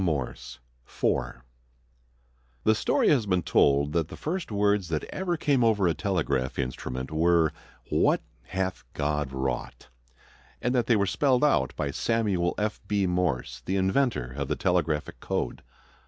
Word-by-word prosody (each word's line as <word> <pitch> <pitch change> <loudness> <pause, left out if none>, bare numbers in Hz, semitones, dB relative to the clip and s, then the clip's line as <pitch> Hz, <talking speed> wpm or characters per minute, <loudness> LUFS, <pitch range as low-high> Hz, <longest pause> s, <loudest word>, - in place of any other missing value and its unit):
Morse_ 70 -5 -3 0.3
FOUR - - -2 1.2
The 110 - +5
story 110 - +2
has 125 -8 +3
been 90 -3 +1
told 70 0 +3
that 80 -2 +1
the - - -10
first 170 -3 -3
words 100 -2 +2
that 80 -2 -2
ever 180 -2 -1
came 140 -5 +2
over 105 -5 +3
a 85 - +2
telegraph 75 -10 -1
instrument 65 0 -4
were 80 0 +3 0.4
"What - - +3 0.2
hath 95 0 -3
God 75 -1 -1
Wrought!" 65 -2 -4 0.7
and 125 +1 0
that 125 -2 +1
they 120 - +4
were 100 -2 +2
spelled 130 +6 +2
out 75 - +2
by 70 -2 -2
Samuel 100 -3 0
F. 105 0 -2
B. 100 -1 +1
Morse, 90 -8 -1
the 95 - -2
inventor 95 - +1
of 70 -1 -3
the 75 - 0
telegraphic 80 -5 0
code. - - -3
90 Hz, 150 wpm, -27 LUFS, 70-105 Hz, 1.2 s, The